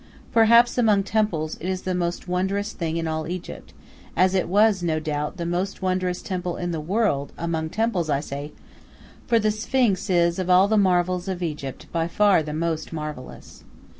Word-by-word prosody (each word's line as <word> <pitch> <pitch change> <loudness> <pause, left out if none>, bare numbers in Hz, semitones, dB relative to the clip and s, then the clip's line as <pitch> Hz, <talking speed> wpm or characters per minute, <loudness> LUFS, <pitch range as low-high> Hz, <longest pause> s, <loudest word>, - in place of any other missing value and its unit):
Perhaps, 235 +2 +5
among 210 -4 +4
temples, 190 -8 -1
it 180 - -4
is 185 0 -3
the 185 - -1
most 175 0 -2
wondrous 190 +3 -1
thing 165 -1 -3
in 165 -1 -2
all 155 -1 -2
Egypt, 180 +1 -7 0.4
as 185 0 +3
it 185 - +1
was, 205 0 +4
no 160 -2 0
doubt, 150 +2 -3
the 170 - -3
most 180 +3 -2
wondrous 185 -1 -1
temple 180 -2 -3
in 175 0 -3
the 160 -2 -3
world; 175 -5 0
among 165 -1 -2
temples 210 -5 -1
I 140 -2 +2
say, 145 0 -6 0.8
for 235 - +4
the 215 -1 +2
Sphinx 215 -3 0
is 170 -1 +2
of 185 -1 -2
all 185 +2 +6
the 220 - +1
marvels 180 -2 +2
of 185 -2 -3
Egypt 145 -5 -5
by 165 -1 0
far 200 0 +3
the 150 -1 -5
most 160 +1 -2
marvellous. 150 -5 -8
180 Hz, 185 wpm, -24 LUFS, 160-200 Hz, 0.8 s, all